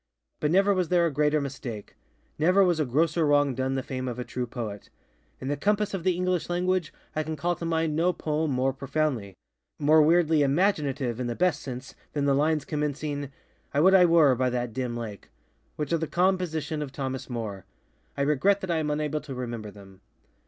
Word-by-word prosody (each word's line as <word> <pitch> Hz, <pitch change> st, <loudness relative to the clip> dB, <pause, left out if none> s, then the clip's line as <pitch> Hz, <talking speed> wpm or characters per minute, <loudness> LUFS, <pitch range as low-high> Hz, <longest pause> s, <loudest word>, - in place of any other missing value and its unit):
_But 150 Hz, -, +1 dB
never 195 Hz, +4 st, +4 dB
was 185 Hz, -3 st, 0 dB
there 175 Hz, -1 st, +3 dB
a 165 Hz, -, -1 dB
greater 150 Hz, +1 st, +2 dB
mistake. 130 Hz, -6 st, -6 dB, 0.4 s
Never 180 Hz, +5 st, +5 dB
was 175 Hz, -3 st, +2 dB
a 155 Hz, -, +2 dB
grosser 160 Hz, +6 st, +1 dB
wrong 145 Hz, -2 st, +3 dB
done 130 Hz, +1 st, -1 dB
the 130 Hz, -, -2 dB
fame 130 Hz, 0 st, -4 dB
of 125 Hz, -1 st, -4 dB
a 125 Hz, -, -3 dB
true 125 Hz, 0 st, -4 dB
poet. 110 Hz, -4 st, -6 dB, 0.5 s
In 130 Hz, -, -6 dB
the 145 Hz, -, 0 dB
compass 210 Hz, +7 st, 0 dB
of 190 Hz, -4 st, -3 dB
the 185 Hz, 0 st, +3 dB
English 180 Hz, -1 st, -1 dB
language 180 Hz, -1 st, 0 dB, 0.2 s
I 155 Hz, -, +1 dB
can 155 Hz, 0 st, -4 dB
call 175 Hz, +4 st, -1 dB
to 170 Hz, -, -5 dB
mind 160 Hz, -2 st, 0 dB
no 170 Hz, +3 st, +3 dB
poem 155 Hz, -2 st, -2 dB
more 130 Hz, 0 st, +1 dB
profoundlyŌĆömore 135 Hz, -7 st, -2 dB, 0.7 s
weirdly 160 Hz, 0 st, +4 dB
_imaginative, 140 Hz, -, +1 dB
_in 125 Hz, -1 st, -3 dB
the 120 Hz, -, -3 dB
best 180 Hz, -5 st, +1 dB
sense, 130 Hz, 0 st, -7 dB, 0.2 s
than 145 Hz, -1 st, 0 dB
the 140 Hz, -, +3 dB
lines 150 Hz, +2 st, +1 dB
commencingŌĆöŌĆ£I 145 Hz, -1 st, -3 dB, 0.5 s
would 190 Hz, +2 st, +6 dB
I 185 Hz, -2 st, +7 dB
were 165 Hz, -5 st, +5 dB
by 125 Hz, +1 st, +1 dB
that 120 Hz, -2 st, -2 dB
dim 125 Hz, -1 st, -3 dB
lakeŌĆØŌĆöwhich 120 Hz, -, -8 dB
are -, -, +4 dB
the 160 Hz, -, -2 dB
com. 185 Hz, +4 st, +3 dB
position 160 Hz, -4 st, -3 dB
of 145 Hz, -3 st, -5 dB
Thomas 130 Hz, -2 st, -4 dB
Moore. 110 Hz, -6 st, -5 dB, 0.5 s
I 140 Hz, -, +1 dB
regret 150 Hz, +8 st, +2 dB
that 190 Hz, -, -3 dB
I 165 Hz, -, +1 dB
am 155 Hz, -1 st, -1 dB
unable 150 Hz, 0 st, -1 dB
to 140 Hz, -2 st, -8 dB
remember 120 Hz, -4 st, -5 dB
them. 100 Hz, -2 st, -15 dB
150 Hz, 200 wpm, -27 LUFS, 130-170 Hz, 0.7 s, I